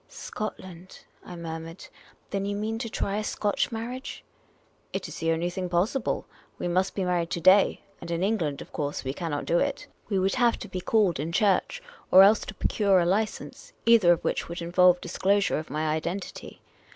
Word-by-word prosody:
" - - -38
Scotland? 185 -4 -8
" - - -33
I - - -7
murmured. 165 0 -7 0.2
" - - -31
Then 195 -1 -1
you 200 0 -2
mean 220 +2 -3
to 230 -1 -4
try 200 -1 -2
a 215 - -2
Scotch 210 +1 -1
marriage? 245 +4 -6 0.3
" - - -38
"It - - -3
is - - -8
the 165 0 +1
only 170 +2 -1
thing 180 0 -4
possible. 195 +9 0 0.3
We - - -3
must 185 +2 0
be 195 - -1
married 175 -2 0
to 175 - -2
day, 185 +3 +5 0.2
and 170 - -8
in 170 +1 -1
England, 175 -9 -1
of - - -21
course, 145 -2 -3
we 130 0 -3
cannot 155 -3 -4
do 170 - +2
it. - - -1 0.2
We 200 - 0
would 190 +1 +1
have 240 -2 +2
to - - -8
be 185 - -5
called 200 -7 +2
in 155 +3 -3
church, 210 - +1 0.3
or 190 +1 +9
else 205 +2 +6
to - - -7
procure 200 -3 +2
a 170 - +2
license, 215 - -2
either 225 -7 +6
of 175 - +1
which - - -2
would 170 - -5
involve 180 +1 +4
disclosure 195 +1 +1
of 155 - -8
my 155 +3 -2
identity. 170 +5 -5
185 Hz, 210 wpm, -27 LUFS, 170-205 Hz, 0.3 s, or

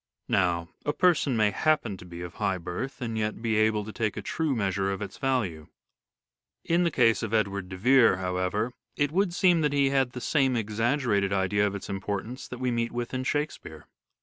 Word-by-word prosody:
Now, 85 -2 +1
a 145 - 0
person 155 -9 +2
may 105 -1 +3
happen 145 -3 +1
to 90 - -12
be 85 -1 -9
of 90 0 -7
high 95 -1 -1
birth 90 - -5
and 115 -1 -3
yet 105 0 -2
be 115 -1 0
able 110 -1 +2
to 110 - -8
take 110 -2 -2
a 105 - -4
true 155 +4 -1
measure 100 -2 0
of 95 - -3
its 100 -2 -7
value. 105 - -1 1.0
In 170 +1 +2
the 170 - +3
case 115 - +3
of 110 0 -1
Edward 100 -3 -1
de 95 - -6
Vere, 125 -1 +5
however, 95 +5 -1 0.2
it 145 0 +1
would 190 +2 +1
seem 175 -1 +3
that 150 -2 +1
he 140 -1 +3
had 135 -3 +1
the 125 - -5
same 135 -1 +1
exaggerated 115 -1 0
idea 100 +1 +2
of 100 - -4
its 100 - -6
importance 100 +5 -4
that 125 - -7
we 125 0 -1
meet 115 0 -1
with 120 +1 -4
in 130 0 -2
Shakespeare. 130 - -3
110 Hz, 205 wpm, -27 LUFS, 95-135 Hz, 1.0 s, Vere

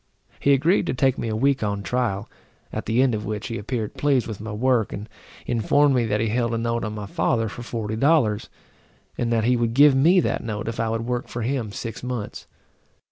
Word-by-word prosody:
He 140 - +4
agreed 155 +8 +2
to - - -1
take 130 0 +2
me - - -2
a 110 - -1
week 135 +4 +2
on 100 -1 -2
trial; 115 -3 -1 0.5
at - - -4
the 120 +4 +3
end 130 -3 +2
of 105 -1 -2
which 105 -1 -4
he 115 - -3
appeared 110 0 -3
pleased 140 -4 +1
with 105 -3 -6
my 110 0 -6
work, 120 +1 +1
and 105 +2 -6 0.4
informed 140 +5 +3
me 120 -3 +2
that 105 0 0
he 110 0 0
held 115 +1 0
a - - 0
note 115 0 -1
on 105 -1 -4
my 105 -1 -5
father 115 +3 0
for 110 - -7
forty 110 -2 -4
dollars, 125 -5 +2 0.7
and 120 -1 -1
that 115 -1 +2
he 125 +2 +3
would 115 -1 0
give 145 +1 +7
me 165 +8 +5
that - - -1
note 105 -2 -4
if 115 - -4
I 115 - 0
would 115 +1 -2
work 125 0 -2
for 120 - -4
him 120 -3 -2
six 115 +2 -6
months. 125 -4 -5
115 Hz, 230 wpm, -23 LUFS, 110-130 Hz, 0.7 s, give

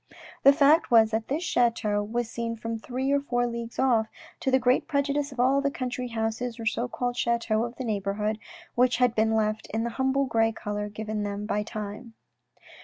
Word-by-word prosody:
The 275 - +8
fact 295 +3 +4
was 225 -2 +5
that 220 0 -1
this 305 +6 -2
chateau 230 -7 +1
was 230 +3 -2
seen 230 0 -4
from 230 0 -5
three 260 +4 -2
or 280 - +3
four 245 -3 0
leagues 235 -1 -5
off, 235 -4 +3 0.3
to - - -1
the 260 - +5
great 250 0 +2
prejudice 285 -1 0
of 260 - -10
all 265 +3 +4
the 280 - +1
country 250 -2 -4
houses 230 +1 -3
or 225 - -5
so 235 +2 0
called 245 0 -3
chateaux 235 -2 +1
of 240 +1 -7
the 260 - -5
neighbourhood, 210 0 -1 0.3
which 250 0 +3
had 250 -2 +3
been 220 0 +2
left 215 0 0
in 225 +1 -1
the 235 - -2
humble 265 +1 +2
grey 225 -2 +2
colour 210 -1 -4
given 215 0 -4
them 205 0 -3
by 210 -1 0
time. 215 +1 -7
235 Hz, 200 wpm, -27 LUFS, 220-255 Hz, 0.3 s, The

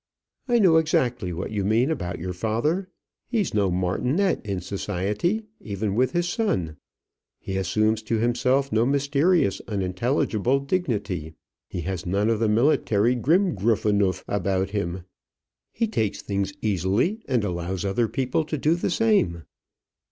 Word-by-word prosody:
"I 240 -1 +3
know 185 -7 +5
exactly 125 - +1
what 85 +4 -4
you 105 -2 -1
mean 115 +8 +2
about 90 - -3
your 90 +2 -4
father: 120 - -1 0.4
he 230 -3 +1
is 195 - -3
no 100 -2 +2
martinet 125 - 0
in 100 -4 -3
society, 105 - -2
even 100 -1 -3
with 125 +4 +1
his 175 0 +1
son. 95 - -1 0.6
He 95 - -6
assumes 110 +4 +1
to 115 +1 0
himself 125 +4 +1
no 110 +1 +3
mysterious 140 - +2
unintelligible 110 +5 0
dignity. 105 - -2 0.3
He 90 - -5
has 90 0 -4
none 100 +5 +1
of 110 - 0
the 110 -1 +2
military 115 -1 +3
Grimgruffenuff 110 - +2
about 95 0 -1
him. 90 -3 -3 0.7
He 230 - 0
takes 110 - -2
things 100 -1 -2
easily, 105 - +1
and 125 -5 +1
allows 90 0 -3
other 105 +4 +1
people 130 +5 -1
to 155 0 -3
do 155 +3 +2
the 175 - -1
same." 175 - +2
110 Hz, 145 wpm, -24 LUFS, 95-140 Hz, 0.7 s, know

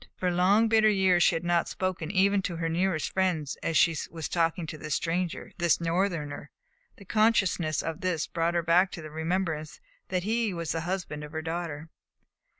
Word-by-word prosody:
For 180 -1 -1
long, 195 +6 +4
bitter 220 -1 +4
years 190 -3 +3
she - - +4
had 165 - -3
not 175 -1 +1
spoken 185 -4 -3
even 200 +1 +3
to 180 -2 -3
her 165 0 -2
nearest 170 -1 0
friends 175 -7 0
as 165 - 0
she 165 -1 +4
was 160 -1 -5
talking 165 0 0
to 155 - -7
this 155 - -2
stranger, 170 +1 -2
this 170 -2 +3
Northerner. 165 -4 -2 0.5
The 200 - -14
consciousness 195 -7 +2
of 165 +3 -4
this 180 -4 0
brought 170 0 -1
her 170 - +1
back 175 +3 +4
to 165 - -7
the 155 - -9
remembrance 160 -1 -2 0.3
that 180 -1 -1
he 220 -1 0
was 170 -1 -3
the 165 - -2
husband 170 -4 -4
of 150 +1 -9
her 160 0 -3
daughter. 165 -2 -4
170 Hz, 190 wpm, -28 LUFS, 160-185 Hz, 0.5 s, long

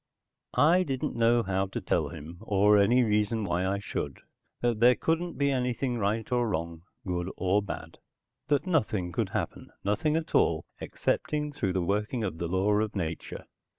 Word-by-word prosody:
I 170 +5 +5
didn't 135 -7 -2
know 115 0 +3
how 95 0 0
to 95 - -4
tell - - 0
him, 85 +4 -9
or 105 -1 +4
any 120 +6 +4
reason 105 0 +1
why 90 -1 0
I 100 +1 0
should, 75 -8 -4 0.4
that 120 -3 +1
there 120 +2 +6
couldn't 170 +2 -1
be 140 0 +2
anything 125 -1 -1
right 110 +3 -1
or 120 -2 +2
wrong, 85 -2 -3 0.2
good 90 -1 -2
or 95 +2 +2
bad; 100 - -7 0.5
that 145 +3 +1
nothing 110 - 0
could - - -1
happen, - - -4
nothing 110 +10 +1
at 165 0 -2
all, 80 -1 +3
excepting 150 -1 -2
through 100 -10 -1
the 95 -1 0
working 105 +6 -1
of 90 -5 -3
the 85 - -2
law 95 +4 +1
of 110 0 -2
nature. 85 -4 -4
105 Hz, 175 wpm, -28 LUFS, 95-125 Hz, 0.5 s, there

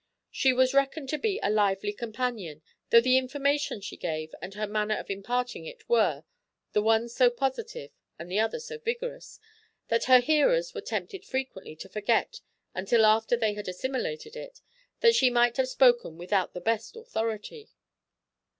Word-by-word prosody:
She 265 - +3
was 255 +1 +3
reckoned 275 +1 +1
to 305 - -2
be 425 -3 -1
a 205 - +2
lively 205 -1 +1
companion, 220 - -4 0.3
though 235 - +7
the 255 +2 +4
information 280 -2 -1
she 200 - -7
gave, 155 -2 -4
and 185 +3 -8
her 215 +1 -2
manner 210 +1 -1
of - - -6
imparting 245 - -3
it - - -12
were, 475 +1 +2 0.5
the 210 - +3
one 225 +2 +2
so 245 +1 +3
positive 275 - -4 0.3
and 170 - -8
the 185 +4 -1
other 225 - 0
so 465 0 -8
vigorous, 475 +2 -5 0.5
that 230 0 +1
her 255 0 +8
hearers 405 - +2
were - - -5
tempted 390 -3 -5
frequently 260 - -5
to 175 - -10
forget, 220 - 0 0.3
until 215 +4 +3
after 220 +2 +3
they 220 -2 +1
had 210 0 -7
assimilated 450 - -4
it, - - -9 0.4
that 465 -1 +6
she 260 - +4
might 240 0 +2
have 260 -1 +1
spoken 240 -11 +3
without 185 +2 -1
the 180 - -5
best 225 - -1
authority. 325 - -5
245 Hz, 170 wpm, -28 LUFS, 210-305 Hz, 0.5 s, her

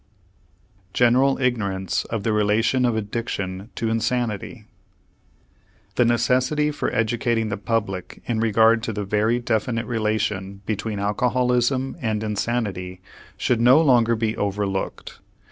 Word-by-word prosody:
GENERAL 130 +3 +4
IGNORANCE 100 -7 -1
OF 110 -3 -4
THE 110 - +1
RELATION 110 +5 +2
OF 120 -2 +1
ADDICTION 100 -2 -4
TO 115 - -1
INSANITY 115 -2 -2 1.3
The 125 - +3
necessity 130 +6 +2
for 150 - -2
educating 115 0 0
the 100 - -3
public 95 -3 -3
in 115 -2 -1
regard 115 +1 +4
to 115 0 -3
the 105 0 -3
very 105 +4 +1
definite 115 0 -1
relation 105 -4 -2
between 110 0 -3
alcoholism 125 +5 +1
and 110 -3 -1
insanity 100 -4 -2 0.4
should 120 -2 +1
no 125 +5 +7
longer 120 -7 +4
be 110 -1 -1
overlooked. 100 -1 -3
115 Hz, 120 wpm, -23 LUFS, 105-120 Hz, 1.3 s, no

